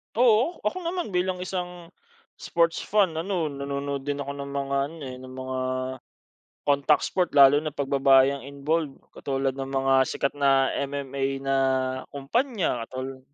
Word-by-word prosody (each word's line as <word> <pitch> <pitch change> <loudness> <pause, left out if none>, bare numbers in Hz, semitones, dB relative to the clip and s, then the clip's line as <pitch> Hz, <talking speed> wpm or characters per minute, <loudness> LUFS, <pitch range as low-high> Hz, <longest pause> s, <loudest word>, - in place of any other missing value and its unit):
Oo, 245 +7 +3
ako - - -1
naman 350 - -2
bilang 180 0 -1
isang, 180 -2 -5 0.5
sport's 170 -1 +1
fan, 195 -6 +2
ano 170 -2 -1
nanonood 140 0 -4
din 145 0 -2
ako 140 - -5
ng 140 0 -6
mga 140 0 -2
ano, 165 - -11
eh, 125 - -8
ng 130 0 -10
mga 130 0 -4 1.1
contact 145 +1 +3
sport. 180 -2 0
Lalo 140 +1 +8
na 155 -1 -4
pag 140 -2 -3
babae 135 0 +5
ang 140 - -7
involved 140 +1 -2 0.2
katulad 135 -1 -2
ng 135 0 -5
mga 135 0 +1 0.2
sikat 140 - -1
na 135 -2 +3
MMA 140 -1 -3 0.2
na 135 0 +1 0.5
kumpanya 165 - -1
katulad 130 +1 -6
140 Hz, 155 wpm, -26 LUFS, 135-175 Hz, 1.1 s, Lalo